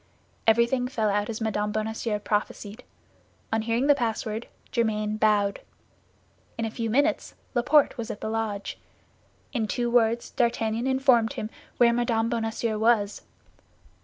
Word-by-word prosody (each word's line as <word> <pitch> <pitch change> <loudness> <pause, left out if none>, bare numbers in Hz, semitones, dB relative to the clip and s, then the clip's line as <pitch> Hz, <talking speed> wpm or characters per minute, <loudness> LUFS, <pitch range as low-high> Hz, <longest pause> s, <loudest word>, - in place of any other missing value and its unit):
Everything 235 +3 +3
fell 220 -5 0
out 205 +1 0
as 225 0 -4
Mme. 210 -1 0
Bonacieux 220 0 -2
prophesied. 210 +2 -3 0.7
On 220 - +2
hearing 230 +4 0
the 290 - +6
password, 225 -3 -2 0.2
Germain 215 -2 0
bowed. 205 -2 +2 1.0
In 230 - -1
a 220 - -3
few 230 0 -3
minutes, 275 +6 +1 0.2
Laporte 275 +2 +3
was 230 0 -4
at 205 - -5
the - - -4
lodge; 220 -2 -3 0.7
in 225 -4 0
two 240 +2 -1
words 235 -1 +2
D'Artagnan 235 -1 0
informed 260 -4 +3
him 215 - -5 0.3
where 235 -1 +5
Mme. 230 -1 +1
Bonacieux 225 -1 -1
was. 220 -2 +2
225 Hz, 135 wpm, -26 LUFS, 215-240 Hz, 1.0 s, the